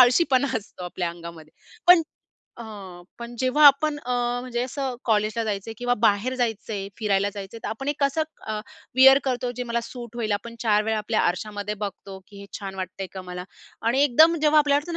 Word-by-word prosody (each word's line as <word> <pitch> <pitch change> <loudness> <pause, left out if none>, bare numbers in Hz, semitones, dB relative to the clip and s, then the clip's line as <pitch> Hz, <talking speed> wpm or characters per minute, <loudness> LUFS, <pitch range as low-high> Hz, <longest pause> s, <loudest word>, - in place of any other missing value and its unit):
आळशीपणा 260 +1 +5
असतो 190 -3 -11
आपल्या 175 0 -3
अंगामध्ये 170 -2 -11 0.4
पण 355 -2 +9 0.6
हं. 195 -6 -9 0.2
पण 235 0 -8
जेव्हा 270 +4 +5
आपण 290 +1 +5
अ, 250 -3 -4 0.3
म्हणजे 245 -1 -3
असं 260 0 -3
कॉलेजला 215 +1 +1
जायचंय 215 +1 -4
किंवा 245 0 +1
बाहेर 220 +4 +2
जायचंय, 220 -4 -2
फिरायला 200 -2 +1
जायचंय, 200 +3 -7
तर - - -2
आपण 270 +6 -5
एक 295 - -1
कसं 280 +3 +1 0.3
अ, 215 -1 -2 0.4
वेअर 270 +1 +8
करतो 250 -2 -1
जे 250 - -3
मला 235 0 -1
सूट 240 -1 -9
होईल, 220 -3 -1
आपण 230 +3 -4
4 210 -2 +3
वेळा 220 -1 0
आपल्या 215 +1 0
आरशामध्ये 205 +3 -2
बघतो 195 0 -7
की 200 -2 -12
हे 200 - -10
छान 195 -1 -6
वाटतंय 185 +1 -5
का 190 - -7
मला? 180 0 -7 0.4
आणि 240 +5 +2
एकदम 315 +6 +5
जेव्हा 305 0 +5
आपल्याला 285 -1 +3
वाटतं 320 +4 -6
225 Hz, 190 wpm, -24 LUFS, 200-260 Hz, 0.6 s, पण